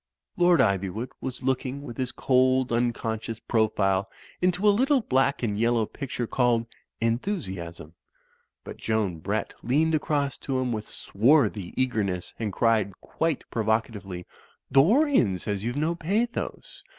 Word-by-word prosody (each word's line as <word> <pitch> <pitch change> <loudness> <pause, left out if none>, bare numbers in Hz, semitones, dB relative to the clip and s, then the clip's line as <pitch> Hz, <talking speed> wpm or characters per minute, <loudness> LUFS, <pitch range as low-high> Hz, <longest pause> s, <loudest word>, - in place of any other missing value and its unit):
Lord 175 -4 +5
Ivywood 100 +2 0
was 130 0 -5
looking 130 +1 -1
with 120 -5 -8
his 130 -2 -1
cold, 130 0 +2
uncon 115 -2 0
scious 115 -1 -6
profile 100 -4 +1 0.3
into 180 +3 +2
a - - +8
little 265 +5 +3
black 135 - +1
and 105 -3 -1
yellow 115 -1 +2
picture 125 0 -4
called 120 -1 +1 0.3
"Enthusiasm"; 95 - -3 0.7
but - - -9
Joan 105 -7 -1
Brett 100 +5 -2
leaned 155 +7 +2
across 145 -2 0
to 135 -2 -2
him 130 -1 0
with 110 -2 -4
swarthy 110 - +2
eagerness 105 -8 -1
and 110 -3 -2
cried 110 -3 +1
quite 165 -4 -2
provo 110 -1 +2
catively, 95 -6 -9 0.5
"Dorian 175 - +4
says 100 +2 -3
youVe 120 +2 -2
no 155 +3 +1
pathos. 200 +8 -3
120 Hz, 140 wpm, -26 LUFS, 105-140 Hz, 0.7 s, a